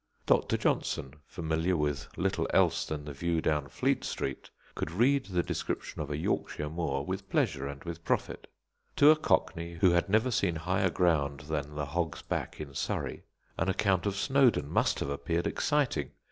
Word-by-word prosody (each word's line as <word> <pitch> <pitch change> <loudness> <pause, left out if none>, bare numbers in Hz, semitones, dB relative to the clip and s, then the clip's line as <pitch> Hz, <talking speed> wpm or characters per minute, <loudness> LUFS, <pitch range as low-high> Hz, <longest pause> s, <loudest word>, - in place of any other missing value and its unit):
Dr. - - +3
Johnson, 65 0 -1
familiar 80 +2 0
with 75 -3 -1
little - - 0
else - - +3
than 75 -2 -4
the 75 - -6
view 85 +4 0
down 75 -3 0
Fleet 70 - 0
Street, 70 - -4 0.2
could - - -3
read 130 +10 +2
the 90 -3 0
description - - -3
of 75 - -4
a 75 - -2
Yorkshire 75 -1 -2
moor 70 -5 -1
with - - -4
pleasure 70 0 0
and 70 0 -7
with 85 -1 -6
profit. - - -1 0.5
To 145 +1 +8
a - - +6
cockney 85 - 0
who 90 +2 +4
had 85 +2 +2
never 110 +5 +3
seen 95 -6 +1
higher 95 +4 +1
ground 75 -6 +1
than 75 0 -4
the 75 -1 -2
Hog's 80 +3 -2
Back - - -3
in 75 -3 -7
Surrey, - - -3 0.3
an 85 - +1
account 95 0 +1
of 100 - -1
Snowdon 120 - +3
must - - +2
have - - -1
appeared 70 +5 -1
exciting. 145 -3 0
85 Hz, 175 wpm, -30 LUFS, 75-95 Hz, 0.5 s, To